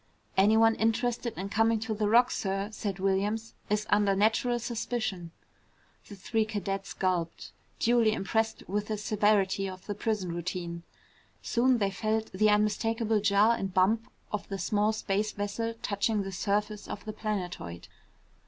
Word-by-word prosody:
"Anyone 220 Hz, +3 st, +5 dB
interested 235 Hz, +1 st, 0 dB
in 195 Hz, +2 st, -4 dB
coming 225 Hz, +2 st, +2 dB
to 225 Hz, -1 st, -2 dB
the 210 Hz, -1 st, 0 dB
Rock, 240 Hz, +3 st, +5 dB
sir," 195 Hz, +1 st, -2 dB
said 205 Hz, -3 st, -4 dB
Williams, 200 Hz, +4 st, 0 dB, 0.2 s
"is 210 Hz, 0 st, +1 dB
under 205 Hz, -1 st, +4 dB
natural 225 Hz, +4 st, +2 dB
suspicion." 225 Hz, -6 st, -3 dB, 0.8 s
The 205 Hz, -, -9 dB
three 220 Hz, +3 st, 0 dB
cadets 195 Hz, -2 st, -3 dB
gulped, 180 Hz, -3 st, -2 dB, 0.3 s
duly 235 Hz, -2 st, +3 dB
impressed 220 Hz, +2 st, -1 dB
with 205 Hz, +2 st, -2 dB
the 215 Hz, -, -2 dB
severity 205 Hz, -2 st, +2 dB
of 185 Hz, 0 st, -10 dB
the 205 Hz, -, -3 dB
prison 205 Hz, -3 st, -2 dB
routine. 170 Hz, 0 st, -4 dB, 0.6 s
Soon 250 Hz, +1 st, +3 dB
they 200 Hz, -3 st, 0 dB
felt 220 Hz, +3 st, -1 dB
the 215 Hz, +3 st, +3 dB
unmistakable 220 Hz, +1 st, +2 dB
jar 205 Hz, +3 st, +4 dB
and 195 Hz, -4 st, -4 dB
bump 215 Hz, +5 st, +2 dB, 0.2 s
of 210 Hz, -, -4 dB
the 195 Hz, -, -3 dB
small 210 Hz, +2 st, +1 dB
space 215 Hz, -1 st, -1 dB
vessel 225 Hz, +3 st, -3 dB
touching 205 Hz, +1 st, 0 dB
the 195 Hz, -, -5 dB
surface 205 Hz, +2 st, -1 dB
of 205 Hz, -, -7 dB
the 215 Hz, -, -5 dB
planetoid. 180 Hz, -, -4 dB
210 Hz, 150 wpm, -29 LUFS, 195-225 Hz, 0.8 s, Anyone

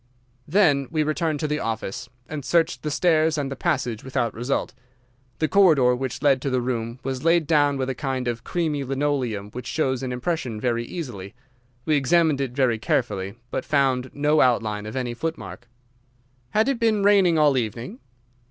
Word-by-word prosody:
"Then 145 Hz, -7 st, +3 dB
we 155 Hz, -2 st, 0 dB
returned 155 Hz, 0 st, -1 dB
to 155 Hz, -, 0 dB
the 150 Hz, 0 st, -1 dB
office, 110 Hz, -6 st, -4 dB, 0.2 s
and 150 Hz, -2 st, -5 dB
searched 165 Hz, +4 st, +1 dB
the 155 Hz, -, -3 dB
stairs 160 Hz, 0 st, +2 dB
and 140 Hz, -2 st, -2 dB
the -, -, -3 dB
passage 130 Hz, -8 st, -1 dB
without 120 Hz, -4 st, -1 dB
result. 125 Hz, +4 st, -2 dB, 0.6 s
The 155 Hz, -, +1 dB
corridor 155 Hz, -11 st, +5 dB
which 130 Hz, +1 st, -4 dB
led 135 Hz, -3 st, +4 dB
to 140 Hz, -, -1 dB
the 130 Hz, -1 st, +1 dB
room 120 Hz, -1 st, -3 dB
was 130 Hz, -1 st, -4 dB
laid 165 Hz, 0 st, +3 dB
down 145 Hz, -2 st, +3 dB
with 130 Hz, -1 st, -2 dB
a 135 Hz, -, -1 dB
kind 130 Hz, -1 st, -3 dB
of 115 Hz, -1 st, -3 dB
creamy 155 Hz, -5 st, -1 dB
linoleum 130 Hz, -7 st, -2 dB
which 125 Hz, +2 st, -7 dB
shows 130 Hz, -3 st, -1 dB
an 130 Hz, -1 st, -3 dB
impression 125 Hz, -3 st, -3 dB
very 120 Hz, 0 st, -1 dB
easily. 115 Hz, -, -7 dB, 0.5 s
We 155 Hz, -2 st, +3 dB
examined 150 Hz, +1 st, +2 dB
it 130 Hz, -3 st, -3 dB
very 125 Hz, -4 st, +1 dB
carefully, 100 Hz, -2 st, -1 dB, 0.2 s
but -, -, -2 dB
found 130 Hz, -3 st, +1 dB
no 150 Hz, +1 st, +2 dB
outline 110 Hz, -4 st, +1 dB
of 110 Hz, -, -7 dB
any 125 Hz, -2 st, -2 dB
footmark." 160 Hz, -3 st, -6 dB, 0.8 s
"Had 215 Hz, -, +2 dB
it 275 Hz, -4 st, 0 dB
been 220 Hz, -3 st, +2 dB
raining 195 Hz, -5 st, +5 dB
all 150 Hz, -3 st, +4 dB
evening?" 120 Hz, -, -3 dB
135 Hz, 180 wpm, -24 LUFS, 125-155 Hz, 0.8 s, corridor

